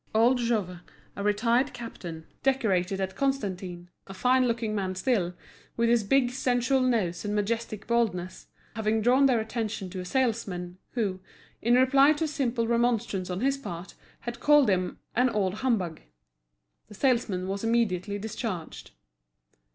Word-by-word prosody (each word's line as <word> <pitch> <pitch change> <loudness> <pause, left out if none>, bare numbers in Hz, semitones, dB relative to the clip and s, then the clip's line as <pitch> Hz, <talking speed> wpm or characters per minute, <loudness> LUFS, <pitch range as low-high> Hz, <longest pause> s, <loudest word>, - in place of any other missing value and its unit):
Old 240 +3 +4
Jouve, 210 -7 -1 0.4
a - - -5
retired 230 +6 +2
captain, 175 -9 -8 0.2
decorated 200 -8 +1
at 190 0 -3
Constantine, 190 -9 -2 0.2
a 195 - -9
fine 255 +4 +3
looking 230 -2 -1
man 190 -3 -2
still, 185 -5 0 0.4
with 235 0 +2
his 235 -2 +3
big 245 +3 +2
sensual 255 +1 +1
nose 220 -9 0
and 210 0 -2
majestic 215 0 -2
baldness, 200 -7 -1 0.3
having 220 0 0
drawn 260 +4 +5
their 250 -4 +3
attention 220 -4 -3
to 185 - -5
a 180 - -5
salesman, 190 -7 -1
who, 200 -6 -1 0.4
in 240 +2 +3
reply 270 +3 +5
to 310 - -3
a - - +1
simple 250 -6 -1
remonstrance 230 -5 0
on 180 +2 -3
his 275 +1 +1
part, 175 -8 -7 0.3
had 240 0 -6
called 295 -6 +5
him 185 -1 -1 0.2
"an 250 +2 +4
old 200 -5 0
humbug," 195 -11 0 0.9
the 210 - -13
salesman 225 -7 +1
was 195 +2 -3
immediately 205 -4 0
discharged. 205 -4 -5
225 Hz, 150 wpm, -27 LUFS, 190-245 Hz, 0.9 s, drawn